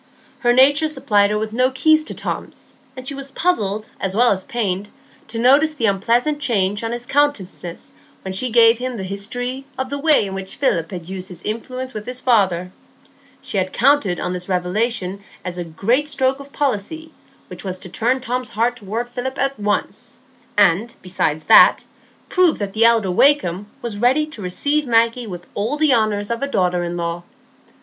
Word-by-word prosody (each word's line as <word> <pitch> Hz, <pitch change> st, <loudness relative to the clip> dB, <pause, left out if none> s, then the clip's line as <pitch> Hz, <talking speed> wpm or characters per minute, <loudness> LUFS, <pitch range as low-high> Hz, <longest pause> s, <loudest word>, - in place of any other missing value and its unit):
Her 240 Hz, -, +2 dB
nature 285 Hz, +5 st, +5 dB
supplied 205 Hz, -9 st, +2 dB
her 210 Hz, -, 0 dB
with 215 Hz, 0 st, -4 dB
no 255 Hz, +2 st, +3 dB
key 310 Hz, +4 st, +4 dB
to 310 Hz, 0 st, -3 dB
Tom's; -, -, -6 dB, 0.2 s
and 255 Hz, 0 st, -6 dB
she 280 Hz, -, -2 dB
was 275 Hz, 0 st, -6 dB
puzzled 215 Hz, -, -1 dB
as 190 Hz, 0 st, -2 dB
well 240 Hz, +2 st, +4 dB
as 190 Hz, -2 st, -1 dB
pained 205 Hz, -4 st, -2 dB, 0.4 s
to 230 Hz, -, -7 dB
notice 280 Hz, +6 st, +4 dB
the 235 Hz, -, 0 dB
unpleasant 235 Hz, +9 st, +1 dB
change 205 Hz, -6 st, 0 dB
on 225 Hz, -, -2 dB
his 240 Hz, 0 st, -5 dB
countenance 245 Hz, -12 st, -2 dB, 0.3 s
when 190 Hz, -, -5 dB
she 250 Hz, +7 st, 0 dB
gave 230 Hz, 0 st, +6 dB
him 255 Hz, -1 st, -4 dB
the 195 Hz, -, -5 dB
history 245 Hz, +7 st, -4 dB
of 260 Hz, 0 st, -4 dB
the 285 Hz, -, -3 dB
way 300 Hz, -6 st, +4 dB
in 195 Hz, -, -6 dB
which 195 Hz, 0 st, -4 dB
Philip 170 Hz, -, 0 dB
had 175 Hz, -3 st, -7 dB
used 190 Hz, 0 st, -5 dB
his 180 Hz, -3 st, -9 dB
influence 255 Hz, +4 st, -5 dB
with 215 Hz, +1 st, -7 dB
his 250 Hz, 0 st, -5 dB
father. 190 Hz, -8 st, +1 dB, 0.7 s
She 200 Hz, -, -2 dB
had 185 Hz, 0 st, -2 dB
counted 255 Hz, -9 st, +2 dB
on 180 Hz, -, -2 dB
this 180 Hz, +1 st, -6 dB
revelation 190 Hz, +1 st, -1 dB, 0.2 s
as 180 Hz, -1 st, -4 dB
a -, -, -2 dB
great 230 Hz, -, 0 dB
stroke 265 Hz, -1 st, 0 dB
of 280 Hz, 0 st, -12 dB
policy, 290 Hz, +5 st, -3 dB, 0.4 s
which -, -, -10 dB
was 185 Hz, -2 st, -3 dB
to 185 Hz, -, -10 dB
turn 245 Hz, +8 st, 0 dB
Tom's 250 Hz, 0 st, -2 dB
heart 235 Hz, +2 st, 0 dB
toward 225 Hz, +3 st, -4 dB
Philip 250 Hz, +2 st, -5 dB
at 275 Hz, -2 st, -1 dB
once, 205 Hz, 0 st, -2 dB, 0.4 s
and, 205 Hz, +4 st, +3 dB
besides 160 Hz, -4 st, -1 dB
that, -, -, +7 dB, 0.4 s
prove 365 Hz, -4 st, +3 dB
that 200 Hz, -2 st, -4 dB
the 225 Hz, +1 st, +4 dB
elder 225 Hz, -5 st, +3 dB
Wakem 205 Hz, -5 st, +3 dB, 0.2 s
was 220 Hz, -4 st, -5 dB
ready 260 Hz, +6 st, +3 dB
to 305 Hz, -8 st, -9 dB
receive 285 Hz, +11 st, 0 dB
Maggie 230 Hz, +1 st, +2 dB
with 175 Hz, -3 st, -8 dB
all 225 Hz, +9 st, -2 dB
the 305 Hz, -3 st, +4 dB
honours 215 Hz, -2 st, 0 dB
of 235 Hz, -, -2 dB
a 280 Hz, -, -1 dB
daughter 180 Hz, -8 st, 0 dB
in 175 Hz, 0 st, -4 dB
law. 170 Hz, 0 st, -3 dB
230 Hz, 190 wpm, -20 LUFS, 195-260 Hz, 0.7 s, that